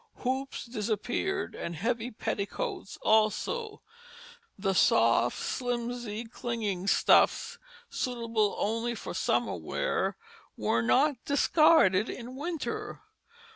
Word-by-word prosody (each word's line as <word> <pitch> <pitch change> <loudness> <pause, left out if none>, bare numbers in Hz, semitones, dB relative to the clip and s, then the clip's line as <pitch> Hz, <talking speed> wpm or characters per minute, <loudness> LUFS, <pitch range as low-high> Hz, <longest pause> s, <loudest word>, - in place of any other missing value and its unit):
Hoops 265 +1 -2
disappeared 240 - -2
and 170 - -5
heavy 235 +6 -1
petticoats 310 - -4
also; 415 - +1 0.7
the 195 -1 0
soft 115 -7 +3
slimsy 240 -2 -3
clinging 220 -5 -3
stuffs, - - +3 0.3
suitable 230 -4 -1
only 230 +3 -1
for - - -6
summer 120 -7 0
wear, 80 -2 -2 0.4
were 110 +2 +1
not 265 - +2
discarded 285 - +4
in 250 +1 -7
winter. 320 +3 -4
235 Hz, 95 wpm, -29 LUFS, 200-260 Hz, 0.7 s, discarded